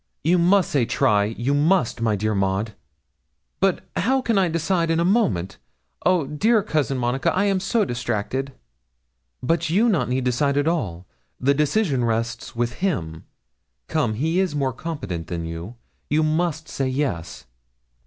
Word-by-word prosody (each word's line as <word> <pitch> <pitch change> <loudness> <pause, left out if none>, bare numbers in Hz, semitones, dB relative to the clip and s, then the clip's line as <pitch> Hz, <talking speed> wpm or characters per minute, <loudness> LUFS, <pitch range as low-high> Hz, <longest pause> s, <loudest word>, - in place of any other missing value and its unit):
'You 175 +4 +3
must 185 +2 +3
say 140 -4 +2
try 105 -5 +2
you 120 +6 -1
must, 150 -4 +2
my 110 -2 +2
dear 110 +2 -1
Maud.' 100 +2 0 0.9
'But - - +1
how 260 +8 +2
can 235 -3 0
I 195 -2 +3
decide 165 +1 0
in 165 0 +2
a 170 - +2
moment? 100 - +1 0.4
Oh, 180 -4 +3
dear 205 - +2
Cousin 145 -5 0
Monica, 125 +2 0
I 190 - +2
am 195 -2 +2
so 210 +3 +1
distracted!' 120 - -2 0.9
'But 165 +4 +1
you 200 +8 +3
need - - +4
not 130 -8 0
decide 140 +3 +1
at 145 +1 +1
all; 95 - -2 0.3
the 140 +2 +3
decision 150 - +1
rests 115 +2 -2
with 120 0 -2
him. 80 - -2 0.6
Come; 110 - 0
he 160 +9 0
is 185 -6 0
more 135 -3 0
competent 100 - -5
than 85 -1 -4
you. 85 +7 -6 0.3
You 155 +2 +2
must 160 0 0
say 135 - -2
yes.' 130 - -3
140 Hz, 160 wpm, -23 LUFS, 115-170 Hz, 0.9 s, need